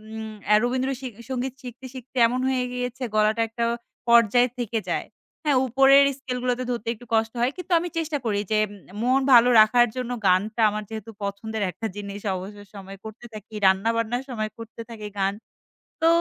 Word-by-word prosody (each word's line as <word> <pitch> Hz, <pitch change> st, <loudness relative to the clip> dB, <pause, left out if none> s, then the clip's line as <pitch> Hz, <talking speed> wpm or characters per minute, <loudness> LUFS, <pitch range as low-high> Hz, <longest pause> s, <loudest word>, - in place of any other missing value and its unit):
উম 220 Hz, -1 st, -6 dB, 0.2 s
আ -, -, +8 dB
Rabindra 255 Hz, +2 st, 0 dB
C 260 Hz, -, -4 dB, 0.2 s
সংগীত 260 Hz, 0 st, -2 dB
শিখতে, 250 Hz, +1 st, -9 dB
শিখতে 260 Hz, 0 st, -10 dB
এমন 250 Hz, +2 st, -2 dB
হয়ে 255 Hz, -1 st, 0 dB
গিয়েছে 250 Hz, +1 st, -4 dB
গলাটা 215 Hz, +1 st, +3 dB
একটা 235 Hz, +1 st, -3 dB, 0.5 s
পর্যায়ে 235 Hz, +1 st, +5 dB
থেকে 230 Hz, -1 st, -1 dB
যায়। -, -, -2 dB, 0.4 s
হ্যাঁ, 290 Hz, -3 st, +3 dB
উপরের 270 Hz, +3 st, +6 dB, 0.2 s
স্কেলগুলাতে 250 Hz, -1 st, -2 dB
ধরতে 235 Hz, -3 st, -3 dB
একটু 240 Hz, +1 st, -14 dB
কষ্ট 225 Hz, 0 st, +2 dB
হয়। 245 Hz, +2 st, +2 dB
কিন্তু 365 Hz, 0 st, -8 dB
আমি 350 Hz, +1 st, -4 dB
চেষ্টা 320 Hz, -2 st, -1 dB
করি 205 Hz, -3 st, 0 dB
যে -, -, +3 dB
এ -, -, -11 dB, 0.3 s
মন 255 Hz, +3 st, +3 dB
ভালো 240 Hz, 0 st, +8 dB
রাখার 240 Hz, +3 st, +5 dB
জন্য 250 Hz, -1 st, -3 dB, 0.2 s
গানটা 210 Hz, +5 st, +2 dB
আমার 210 Hz, +1 st, -4 dB
যেহেতু 220 Hz, 0 st, -7 dB
পছন্দের 205 Hz, +2 st, -3 dB
একটা 225 Hz, +6 st, -4 dB
জিনিস, 200 Hz, 0 st, -6 dB
অবসর 205 Hz, +3 st, -8 dB
সময়ে 195 Hz, 0 st, -10 dB
করতে 220 Hz, +2 st, -10 dB
থাকি, 215 Hz, +1 st, -11 dB
রান্নাবান্নার 230 Hz, +5 st, +2 dB
সময় 215 Hz, -3 st, -3 dB
করতে 230 Hz, 0 st, -9 dB
থাকি 215 Hz, -2 st, -7 dB
গান। 195 Hz, 0 st, +1 dB, 0.7 s
তো 325 Hz, -, +4 dB
230 Hz, 180 wpm, -24 LUFS, 215-250 Hz, 0.7 s, আ